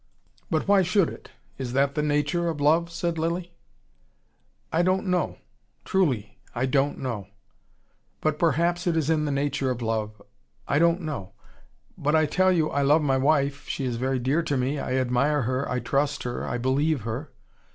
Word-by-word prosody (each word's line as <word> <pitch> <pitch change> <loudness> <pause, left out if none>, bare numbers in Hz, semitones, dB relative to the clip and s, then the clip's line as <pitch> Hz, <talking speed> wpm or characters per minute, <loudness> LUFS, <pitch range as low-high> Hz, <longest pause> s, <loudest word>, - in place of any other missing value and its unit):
"But 160 0 0
why 200 -1 +5
should 185 -1 +2
it? - - -11 0.3
Is 125 -2 -4
that 140 +1 +2
the 150 - 0
nature 150 +3 0
of 160 -3 -4
love?" 160 +4 +3
said 170 -1 -2
Lilly. 170 +2 -2 1.2
"I 165 - +3
don't 185 +2 +1
know. 180 -1 0 0.5
Truly. 120 - 0 0.2
I 120 +2 +1
don't 135 +2 +1
know. 115 -8 -4 0.9
But 155 -1 -1
perhaps 170 +3 +1
it 165 -2 +2
is 160 0 +1
in 155 -1 +1
the 145 - -1
nature 140 -1 0
of 125 -1 -2
love 110 -2 -2 0.5
I 140 - +2
don't 170 +2 +3
know. 145 - -5 0.7
But 150 +2 +1
I 155 0 +4
tell 185 +5 +3
you, 160 -4 +1
I 140 - 0
love 150 +3 +4
my 135 -2 +2
wife 140 0 +1
she 135 - -2
is 120 -2 -2
very 130 +2 0
dear 135 +6 +1
to 145 -4 -1
me. 135 +3 -1
I 130 - -2
admire 130 +3 +1
her, 130 +3 -1
I 125 - 0
trust 140 +4 0
her, 120 -1 -4
I - - -2
believe 135 +3 +1
her. 115 +7 -5
145 Hz, 185 wpm, -26 LUFS, 130-165 Hz, 1.2 s, why